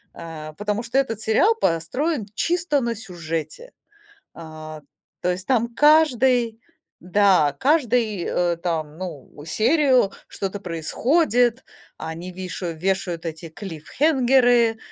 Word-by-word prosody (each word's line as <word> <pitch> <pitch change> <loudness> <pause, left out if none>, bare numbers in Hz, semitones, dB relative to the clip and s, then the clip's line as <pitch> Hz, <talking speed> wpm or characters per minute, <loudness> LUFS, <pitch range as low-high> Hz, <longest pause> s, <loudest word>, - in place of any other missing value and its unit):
э, 155 -2 -8
потому 210 +1 -2
что 235 +3 -2
этот 230 -5 0
сериал 300 - +3
построен 250 - -1
чисто 330 - 0
на 235 -1 -1
сюжете. 170 - -6 0.6
А, 155 -1 -9 0.4
то 180 - +1
есть 185 +2 -5
там 235 -2 +1
каждый, 255 -7 +3 0.4
да, 180 -6 +3
каждый, 245 - +1
э, 175 -1 0
там, 160 -3 -3
ну, 175 -7 -8
серию 255 - +3 0.2
что-то 195 +1 -5
происходит, 240 - +1 0.3
они 165 +3 -6
вишаю 180 -2 -5
вешают 180 -2 -2
эти 165 0 -6
клиффхэнгеры, 240 - +2
205 Hz, 110 wpm, -22 LUFS, 170-250 Hz, 0.6 s, сериал